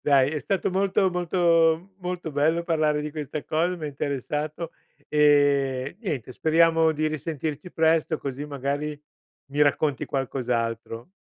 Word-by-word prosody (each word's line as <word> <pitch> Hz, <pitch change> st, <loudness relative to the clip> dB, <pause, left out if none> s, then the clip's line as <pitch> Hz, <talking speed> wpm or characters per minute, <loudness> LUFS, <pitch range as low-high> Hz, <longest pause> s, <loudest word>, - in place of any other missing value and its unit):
Dai 140 Hz, -2 st, +4 dB
è 155 Hz, -, -2 dB
stato 195 Hz, +3 st, -1 dB
molto 190 Hz, 0 st, +2 dB
molto 170 Hz, 0 st, +2 dB
molto 180 Hz, -3 st, -4 dB
bello, 155 Hz, +4 st, +2 dB
parlare 155 Hz, -3 st, +1 dB
di 150 Hz, 0 st, -4 dB
questa 150 Hz, -1 st, -5 dB
cosa, 170 Hz, +3 st, 0 dB
m'ha 155 Hz, -3 st, -5 dB
interessato 150 Hz, +3 st, -3 dB, 0.4 s
e 145 Hz, -2 st, +3 dB
niente, 140 Hz, -, -4 dB
speriamo 165 Hz, +2 st, +3 dB
di 155 Hz, +1 st, -1 dB
risentirci 155 Hz, +1 st, -4 dB
presto 160 Hz, 0 st, +2 dB
così 140 Hz, +1 st, -5 dB
magari 145 Hz, +1 st, -3 dB, 0.5 s
mi 145 Hz, +2 st, -2 dB
racconti 145 Hz, -1 st, +1 dB
qualcos'altro. 120 Hz, -2 st, -3 dB
150 Hz, 130 wpm, -25 LUFS, 140-165 Hz, 0.5 s, Dai